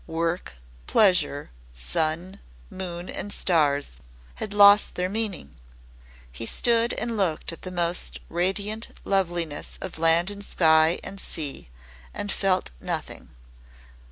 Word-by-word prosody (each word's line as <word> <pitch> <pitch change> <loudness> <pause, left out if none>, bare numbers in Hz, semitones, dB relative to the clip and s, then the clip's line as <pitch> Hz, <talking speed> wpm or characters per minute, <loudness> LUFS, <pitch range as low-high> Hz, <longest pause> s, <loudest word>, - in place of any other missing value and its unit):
Work, 165 - -3 0.3
pleasure, 180 -8 +3 0.2
sun, 155 - -2 0.3
moon, 180 -1 -6
and 205 - -5
stars 145 -7 +1 0.4
had 210 - -4
lost 205 0 +6
their 180 0 -1
meaning. 200 - -3 0.8
He 115 - -5
stood 235 - +3
and 235 -1 -3
looked 180 -7 0
at 165 - -9
the 185 - -7
most 175 -1 -1
radiant 200 +6 -2
loveliness 175 -6 -1
of 185 -4 -6
land 165 +3 +4
and 200 0 -8
sky 160 -3 +3
and 195 - -7
sea 145 - -4 0.5
and 205 - -3
felt 190 - 0
nothing. - - -5
180 Hz, 120 wpm, -25 LUFS, 160-200 Hz, 0.8 s, lost